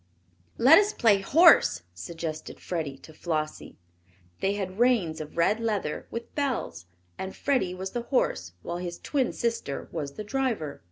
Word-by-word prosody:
"Let 275 Hz, +9 st, +8 dB
us 415 Hz, +1 st, +1 dB
play 210 Hz, -5 st, +4 dB
horse," 195 Hz, -, +6 dB
suggested 155 Hz, -, -6 dB
Freddie 155 Hz, -6 st, -4 dB
to 155 Hz, -, -15 dB
Flossie. 155 Hz, -1 st, -4 dB, 0.6 s
They 195 Hz, -, +1 dB
had 190 Hz, 0 st, -5 dB
reins 220 Hz, -11 st, +2 dB
of 150 Hz, +1 st, -9 dB
red 200 Hz, +6 st, +3 dB
leather, 210 Hz, -9 st, -2 dB
with 230 Hz, 0 st, -7 dB
bells, 255 Hz, -, -2 dB, 0.3 s
and 190 Hz, 0 st, -5 dB
Freddie 255 Hz, -11 st, 0 dB
was 190 Hz, +1 st, -5 dB
the 240 Hz, -, -2 dB
horse 90 Hz, -, 0 dB
while 170 Hz, -, -4 dB
his 175 Hz, -1 st, -5 dB
twin 270 Hz, -4 st, -1 dB
sister 230 Hz, -12 st, -3 dB
was 145 Hz, -4 st, -4 dB
the 215 Hz, -, -6 dB
driver. 215 Hz, -, -2 dB
190 Hz, 155 wpm, -27 LUFS, 155-235 Hz, 0.6 s, Let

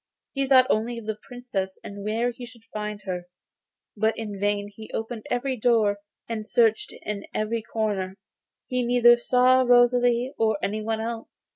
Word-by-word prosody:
He 275 Hz, -1 st, -1 dB
thought 260 Hz, -1 st, +7 dB
only 230 Hz, +2 st, 0 dB
of 230 Hz, -, -8 dB
the 215 Hz, -1 st, -4 dB
Princess 220 Hz, -7 st, -4 dB
and 200 Hz, 0 st, -8 dB
where 225 Hz, +4 st, 0 dB
he 245 Hz, +1 st, -11 dB
should 240 Hz, -2 st, -12 dB
find 210 Hz, -1 st, -4 dB
her, 180 Hz, -2 st, -4 dB, 0.7 s
but 220 Hz, +1 st, +1 dB
in 210 Hz, -3 st, -5 dB
vain 205 Hz, 0 st, -1 dB
he 220 Hz, -1 st, -10 dB
opened 225 Hz, 0 st, -5 dB
every 260 Hz, +2 st, -1 dB
door 220 Hz, -3 st, +2 dB, 0.3 s
and 225 Hz, -2 st, -3 dB
searched 225 Hz, -1 st, +2 dB
in 205 Hz, -1 st, -5 dB
every 225 Hz, +2 st, -1 dB
corner; 205 Hz, -4 st, -2 dB, 0.5 s
he 250 Hz, 0 st, -1 dB
neither 240 Hz, 0 st, +6 dB
saw 250 Hz, +2 st, +4 dB
Rosalie 245 Hz, 0 st, +4 dB
nor 220 Hz, -2 st, +2 dB
anyone 215 Hz, +2 st, -1 dB
else. 230 Hz, 0 st, -5 dB
225 Hz, 160 wpm, -25 LUFS, 210-245 Hz, 0.7 s, thought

